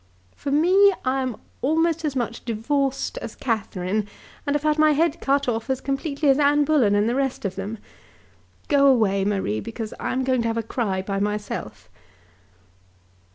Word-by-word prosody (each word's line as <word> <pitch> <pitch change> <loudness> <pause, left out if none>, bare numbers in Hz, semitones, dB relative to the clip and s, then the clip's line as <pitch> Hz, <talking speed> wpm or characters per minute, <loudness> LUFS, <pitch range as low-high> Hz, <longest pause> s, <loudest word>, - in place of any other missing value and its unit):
"For - - -5
me, 365 +8 +5
I 265 +1 +1
am 255 -4 -3 0.2
almost 325 +3 +1
as 295 -3 -2
much 235 -2 -3
divorced 275 - -1
as - - -7
Catherine, 205 -3 -2 0.4
and 285 - +1
have 295 - -1
had 305 0 +1
my 310 0 +5
head 330 +2 +1
cut 280 0 +1
off 230 +1 -2
as 265 -1 0
completely 280 +2 -2
as 270 +1 +4
Anne 290 0 +4
Bullen 260 -10 +3
and 205 +1 +2
the 235 - +1
rest 265 -4 -1
of 190 - -1
them. 200 +3 -5 0.9
Go 280 -2 +4
away, 210 -7 +3
Marie, 195 - -1
because 225 - -6
I - - -2
am 260 +1 0
going 255 -2 +1
to 230 - -1
have 225 0 -1
a 230 - -1
cry 205 -5 -2
by 195 0 -2
myself." 200 - -4
260 Hz, 180 wpm, -23 LUFS, 210-290 Hz, 0.9 s, me